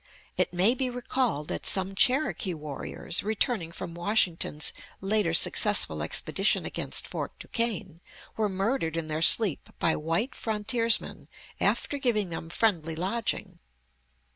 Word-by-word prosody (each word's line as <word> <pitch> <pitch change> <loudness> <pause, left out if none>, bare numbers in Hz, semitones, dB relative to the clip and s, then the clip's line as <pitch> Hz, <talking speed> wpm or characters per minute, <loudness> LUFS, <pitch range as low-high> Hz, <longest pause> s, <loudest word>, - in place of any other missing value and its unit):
It - - 0
may 185 +6 +4
be 260 0 -2
recalled 245 - -2
that - - -1
some 190 0 +4
Cherokee 250 - +1
warriors, 150 +3 -4
returning 215 -4 -1
from 170 - -7
Washington's 175 -4 0 0.3
later 200 -3 +1
successful 205 +5 +3
expedition - - +1
against - - -2
Fort - - -6
Duquesne, 200 -8 -3 0.3
were 215 -2 0
murdered 195 - -1
in 165 - -2
their 155 0 -4
sleep 190 -1 +5
by 165 - +1
white 165 - -1
frontiersmen 225 0 0 0.3
after 285 - 0
giving 215 -8 0
them 165 0 -6
friendly 170 -5 0
lodging. 195 +7 -2
195 Hz, 125 wpm, -27 LUFS, 165-230 Hz, 0.3 s, sleep